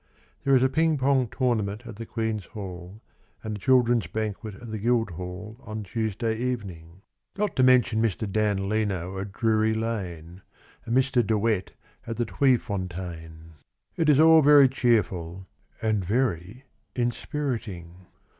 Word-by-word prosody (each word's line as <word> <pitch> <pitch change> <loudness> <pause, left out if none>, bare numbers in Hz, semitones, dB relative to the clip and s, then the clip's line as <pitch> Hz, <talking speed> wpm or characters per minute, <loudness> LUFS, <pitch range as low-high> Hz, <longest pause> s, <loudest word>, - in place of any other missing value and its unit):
There 135 -1 +4
is 130 - +4
a - - +5
ping 160 +3 +1
pong 130 -2 +2
tournament 110 -3 -1
at 110 - -9
the 115 0 -7
Queen's 110 -3 -3
Hall 95 0 -9 0.4
And 110 -1 -4
a - - -7
children's 120 -3 +3
banquet 110 +2 -4
At 115 +2 -10
the 110 - -4
Guildhall 105 -2 -2
on 110 -4 -6
Tuesday 110 +3 -2
evening; 95 -8 -5 0.3
Not 205 -3 -1
to - - +4
mention 125 -3 +4
Mr. 110 -1 -1
Dan 100 -1 0
Leno 95 -3 -2
at 100 +1 -5
Drury 110 0 +1
Lane 95 -6 -4 0.4
And 115 +2 0
Mr. 130 -2 +3
De 110 +1 +1
Wet 105 -3 -1 0.3
at 115 - -4
the 120 - 0
Tweefontein. 90 - -2 0.4
It 165 -3 +1
is 145 -1 +5
all 160 0 +7
very 145 -1 +7
cheerful 95 -8 0 0.4
And 110 -3 +1
very 105 +1 -1 0.3
inspiriting. 115 - -4
110 Hz, 145 wpm, -26 LUFS, 95-125 Hz, 0.4 s, all